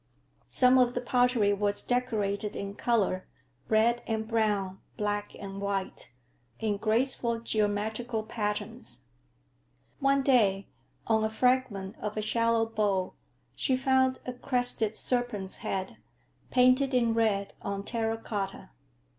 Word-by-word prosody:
Some 255 Hz, 0 st, +5 dB
of 245 Hz, -1 st, +3 dB
the -, -, +1 dB
pottery 245 Hz, -4 st, +3 dB
was 205 Hz, 0 st, +1 dB
decorated 215 Hz, -5 st, -1 dB
in 200 Hz, 0 st, -4 dB
color, 205 Hz, -5 st, 0 dB, 0.4 s
red 230 Hz, +2 st, +3 dB
and 220 Hz, -1 st, -2 dB
brown, 210 Hz, -4 st, 0 dB, 0.2 s
black 205 Hz, 0 st, -2 dB
and 195 Hz, 0 st, -7 dB
white, 200 Hz, -1 st, -3 dB, 0.5 s
in 210 Hz, -2 st, 0 dB
graceful 235 Hz, +2 st, 0 dB
geometrical 220 Hz, +1 st, -1 dB
patterns. 210 Hz, -, -3 dB, 0.9 s
One 275 Hz, 0 st, +3 dB
day, 205 Hz, -8 st, +3 dB, 0.4 s
on 220 Hz, -1 st, +2 dB
a 220 Hz, -, +1 dB
fragment 220 Hz, -4 st, 0 dB
of 210 Hz, 0 st, -4 dB
a -, -, +1 dB
shallow 230 Hz, +1 st, +2 dB
bowl, 205 Hz, -4 st, 0 dB, 0.4 s
she 260 Hz, -2 st, +1 dB
found 260 Hz, 0 st, +2 dB
a 250 Hz, -, -4 dB
crested 245 Hz, -4 st, -1 dB
serpent's 245 Hz, -7 st, -1 dB
head, 190 Hz, -1 st, -4 dB, 0.5 s
painted 255 Hz, +1 st, +4 dB
in 235 Hz, -2 st, +3 dB
red 210 Hz, -3 st, +1 dB
on 200 Hz, 0 st, -3 dB
terra 225 Hz, 0 st, -1 dB
cotta. 195 Hz, -, -5 dB
220 Hz, 120 wpm, -29 LUFS, 205-245 Hz, 0.9 s, Some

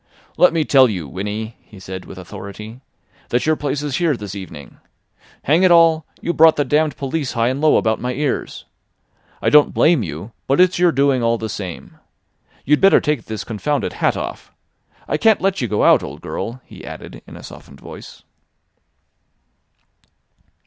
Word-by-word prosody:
"Let 180 Hz, -, +5 dB
me 165 Hz, -2 st, 0 dB
tell 135 Hz, -3 st, +5 dB
you, 90 Hz, -8 st, -4 dB
Winnie," 105 Hz, -, -5 dB
he 105 Hz, -, -16 dB
said 95 Hz, 0 st, -8 dB
with -, -, -11 dB
authority, 100 Hz, +5 st, -9 dB, 0.5 s
"that 120 Hz, -, 0 dB
your 155 Hz, 0 st, +2 dB
place 145 Hz, -1 st, -3 dB
is 145 Hz, -3 st, -2 dB
here 165 Hz, -6 st, +1 dB
this 105 Hz, -3 st, -7 dB
evening. 90 Hz, -8 st, -10 dB, 0.6 s
Hang 155 Hz, +6 st, +3 dB
it 185 Hz, -, +5 dB
all! 165 Hz, -2 st, +4 dB
you 170 Hz, -, -2 dB
brought 160 Hz, -1 st, +6 dB
the 145 Hz, -, 0 dB
damned 150 Hz, +2 st, +1 dB
police 140 Hz, 0 st, -3 dB
high 115 Hz, 0 st, +1 dB
and 130 Hz, +3 st, -3 dB
low 155 Hz, -1 st, +4 dB
about 110 Hz, 0 st, 0 dB
my 125 Hz, -, -2 dB
ears. 140 Hz, 0 st, -3 dB, 0.8 s
I -, -, +2 dB
don't 150 Hz, -1 st, +5 dB
blame 160 Hz, -5 st, +4 dB
you—but 100 Hz, -, -4 dB
it's 180 Hz, -1 st, +4 dB
your 175 Hz, -1 st, +4 dB
doing 140 Hz, -3 st, +2 dB
all 115 Hz, 0 st, +1 dB
the 110 Hz, 0 st, -5 dB
same. 95 Hz, -4 st, -8 dB, 0.7 s
You'd 150 Hz, +1 st, +2 dB
better 195 Hz, 0 st, +6 dB
take 150 Hz, -7 st, -2 dB
this 110 Hz, -1 st, -5 dB
confounded 120 Hz, +3 st, -2 dB
hat -, -, 0 dB
off. -, -, -7 dB, 0.6 s
I -, -, 0 dB
can't 220 Hz, +4 st, +3 dB
let 195 Hz, -3 st, 0 dB
you 120 Hz, -, -1 dB
go 105 Hz, -1 st, 0 dB
out, -, -, +5 dB
old -, -, -8 dB
girl," 120 Hz, +3 st, -6 dB
he -, -, -13 dB
added -, -, -10 dB
in -, -, -12 dB
a -, -, -12 dB
softened 70 Hz, 0 st, -13 dB
voice. -, -, -12 dB
130 Hz, 175 wpm, -19 LUFS, 105-155 Hz, 0.8 s, brought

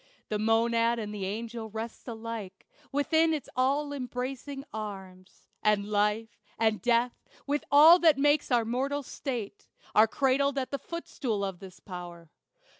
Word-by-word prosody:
The 210 Hz, -, -1 dB
monad 230 Hz, +1 st, +2 dB
and 210 Hz, -2 st, -4 dB
the 195 Hz, -2 st, -3 dB
angel 225 Hz, +2 st, -5 dB
rest 225 Hz, +4 st, -7 dB
alike 225 Hz, -4 st, -7 dB, 0.3 s
Within 320 Hz, +3 st, +2 dB
its 295 Hz, -, -6 dB
all 280 Hz, +3 st, +1 dB
embracing 270 Hz, +1 st, -5 dB
arms; 190 Hz, -3 st, -8 dB, 0.2 s
and 210 Hz, -1 st, +2 dB
life, 210 Hz, +1 st, 0 dB, 0.2 s
And 220 Hz, -1 st, +1 dB
death, 240 Hz, 0 st, +1 dB, 0.2 s
with 290 Hz, +1 st, -1 dB
all 315 Hz, +5 st, +8 dB
that 320 Hz, -5 st, +5 dB
makes 290 Hz, +2 st, +3 dB
our 240 Hz, -3 st, +3 dB
mortal 270 Hz, +5 st, -1 dB
state, 235 Hz, -6 st, -5 dB, 0.3 s
Are 220 Hz, +1 st, +6 dB
cradled 275 Hz, +3 st, +1 dB
at 260 Hz, -1 st, -2 dB
the 280 Hz, -, -2 dB
footstool 250 Hz, -11 st, -3 dB
of 190 Hz, -3 st, -5 dB
this 190 Hz, -2 st, -12 dB
power. 175 Hz, -3 st, -9 dB
230 Hz, 145 wpm, -29 LUFS, 210-275 Hz, 0.3 s, all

